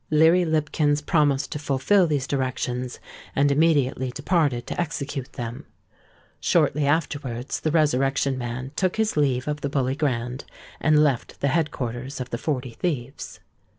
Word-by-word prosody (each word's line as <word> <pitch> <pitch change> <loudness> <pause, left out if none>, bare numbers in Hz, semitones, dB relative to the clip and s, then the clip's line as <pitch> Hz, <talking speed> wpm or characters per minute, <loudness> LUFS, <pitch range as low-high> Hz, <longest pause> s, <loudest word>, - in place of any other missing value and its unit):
Leary 160 +4 +5
Lipkins 150 -2 +1
promised 145 -2 +1
to 150 - -3
fulfil 150 +7 +3
these 145 -4 0
directions, 130 -2 -2 0.4
and 140 +1 +3
immediately 140 -4 +2
departed 145 -3 0
to - - -2
execute 140 -4 -4
them. 120 0 -6 0.7
Shortly 145 0 +2
afterwards 140 -5 -1
the 155 - -1
Resurrection 140 -3 +2
Man 125 +1 -5
took 185 -2 +1
his 220 0 0
leave 135 -3 +1
of 150 0 -2
the 140 - -1
Bully 135 -2 0
Grand, 125 -3 -2 0.4
and 155 -1 +4
left 135 -5 -1
the 140 - +1
head 155 +2 +1
quarters 125 +3 -5
of 125 0 -5
the 120 - -3
Forty 130 -5 -2
Thieves. 135 -2 -4
140 Hz, 150 wpm, -24 LUFS, 130-150 Hz, 0.7 s, Leary